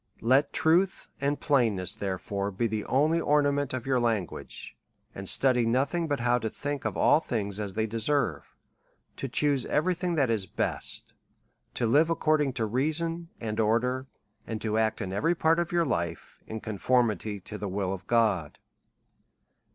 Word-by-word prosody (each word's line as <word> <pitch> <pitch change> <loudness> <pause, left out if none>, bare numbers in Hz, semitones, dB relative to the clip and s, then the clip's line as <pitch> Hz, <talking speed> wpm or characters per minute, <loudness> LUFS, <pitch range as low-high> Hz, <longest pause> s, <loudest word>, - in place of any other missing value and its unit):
Let 130 +6 +3
truth 175 +4 +1
and 140 +1 0
])lainness, 110 -9 +1
therefore, 100 0 -3
be 100 +4 -2
the 110 -2 -2
only 155 +5 +2
or 150 -1 +3
nament 145 -1 0
of 130 -2 -4
your 130 -2 +2
language, 115 -7 -3 0.4
and - - -4
study 125 -3 +4
nothing 135 +9 +1
but 145 -4 -1
how 120 0 +2
to 110 - -2
think 145 +4 -4
of - - -2
all 150 - +5
things 105 -9 -3
as 100 -3 -4
they 110 - +1
deserve, 115 +4 -1 0.6
to 135 - -3
chuse 140 +1 +1
every 180 +5 +1
thing 175 0 -2
that 135 -6 +2
is 105 -4 -1
best, - - -3 0.6
to 120 - 0
live 145 +8 +4
according 155 -4 +2
to 120 -3 -1
reason 160 +8 -1
and 110 -1 -3
or 110 +1 +4
der, 130 +2 -2 0.4
and 110 -1 -3
to 110 -1 -1
act 110 0 0
in 95 -1 -4
every 165 - +1
part 165 0 +3
of 170 0 -1
your 170 -1 +2
life, 85 - -3
in 110 0 -6
conformity 110 -2 0
to 105 +3 -8
the 100 0 -3
will 95 0 -1
of 95 - -8
God. 105 -10 +1
120 Hz, 175 wpm, -28 LUFS, 110-145 Hz, 0.6 s, all